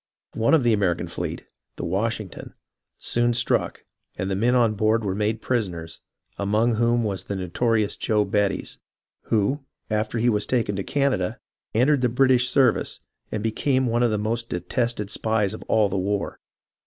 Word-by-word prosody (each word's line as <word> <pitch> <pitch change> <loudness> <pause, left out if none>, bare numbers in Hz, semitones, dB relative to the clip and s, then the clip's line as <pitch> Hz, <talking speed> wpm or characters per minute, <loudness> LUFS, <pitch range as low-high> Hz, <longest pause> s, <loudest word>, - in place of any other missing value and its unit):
One 115 +8 +3
of 150 - +2
the 120 -1 +4
American 95 -5 0
fleet - - -5 0.3
(the - - -6
WasJiing 105 +3 -1
toii) - - -10 0.4
soon 120 0 +1
struck, 120 - +1 0.3
and 95 +1 -2
the - - +1
men 120 +6 +2
on 115 -3 +4
board 110 +2 +1
were 95 - 0
made 105 +2 -1
prisoners, 90 -10 -2 0.4
among 105 +4 +2
whom 120 +1 +2
was 100 -3 -3
the 100 - -4
notorious 105 +4 0
Joe 105 -2 +1
Bettys, 100 -1 -1 0.5
who, 110 +6 +1 0.3
after 110 +2 0
he 115 +2 +1
was 105 -3 +1
taken 115 -5 0
to 100 - -2
Canada, 135 -10 0 0.4
entered 130 +4 +3
the 125 - +2
British 125 0 +3
service, 130 -2 +2 0.3
and 105 - -3
be 115 - +1
came 130 +3 +1
one 120 0 +1
of 120 - +4
the 105 - 0
most 115 +3 -2
detested 105 +4 -2
spies 110 -2 0
of 110 - -7
all 110 -2 +3
the 95 0 -2
war. 100 +1 -2
110 Hz, 175 wpm, -24 LUFS, 100-120 Hz, 0.5 s, the